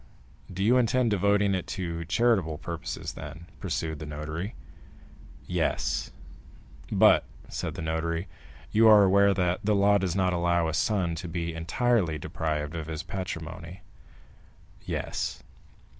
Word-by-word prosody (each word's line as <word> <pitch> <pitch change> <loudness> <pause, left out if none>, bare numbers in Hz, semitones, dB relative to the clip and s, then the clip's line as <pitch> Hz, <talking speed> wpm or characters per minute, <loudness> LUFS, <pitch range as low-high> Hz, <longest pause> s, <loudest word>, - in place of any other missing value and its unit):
"Do 95 +2 -2
you 120 +5 +5
intend 125 -1 +2
devoting 100 0 +3
it 95 -2 -2
to 85 -3 -3
charitable 95 -4 +2
purposes, 85 +1 -5
then?" 80 +3 -9
pursued 80 +3 -3
the 75 - -6
notary. 75 +6 -5 0.9
"Yes." - - -1 0.8
"But," - - +6 0.3
said - - -4
the - - -5
notary, 85 +3 -2 0.4
"you 110 +1 +5
are 105 -2 +8
aware 100 +1 +5
that 90 -1 +1
the 105 0 +2
law 100 +1 +4
does 90 -2 -1
not 95 -2 +2
allow 85 -1 +2
a 80 - -2
son 90 0 +1
to 85 +2 -5
be 85 0 -3
entirely 85 +1 +1
deprived 75 0 -3
of 80 -2 -4
his 80 -1 -4
patrimony?" 90 -1 -6 1.0
"Yes." - - -3
90 Hz, 135 wpm, -28 LUFS, 80-100 Hz, 1.0 s, are